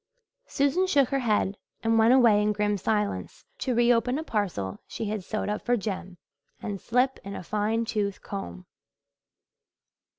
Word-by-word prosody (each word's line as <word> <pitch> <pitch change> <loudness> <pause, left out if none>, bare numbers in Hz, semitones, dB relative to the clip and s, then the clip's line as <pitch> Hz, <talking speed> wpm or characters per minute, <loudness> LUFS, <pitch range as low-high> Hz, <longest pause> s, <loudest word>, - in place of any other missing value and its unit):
Susan 285 +7 +1
shook 280 -8 +3
her 275 - +1
head 210 -4 0 0.2
and 225 0 +3
went 225 +2 +6
away 235 -5 +6
in 210 0 +2
grim 210 0 +1
silence 210 +1 -2
to 255 -3 -1
re 240 +1 +5
open 245 +3 +1
a 315 - -3
parcel 180 - -2
she - - -5
had 210 -2 -3
sewed 215 +3 -3
up 210 0 -2
for 245 0 +1
Jem 190 -3 -5 0.4
and 200 -2 -5
slip 250 +3 +1
in 200 0 -6
a - - -6
fine 215 +4 0
tooth 205 -3 -2
comb. 90 - -6
215 Hz, 165 wpm, -27 LUFS, 200-240 Hz, 0.4 s, went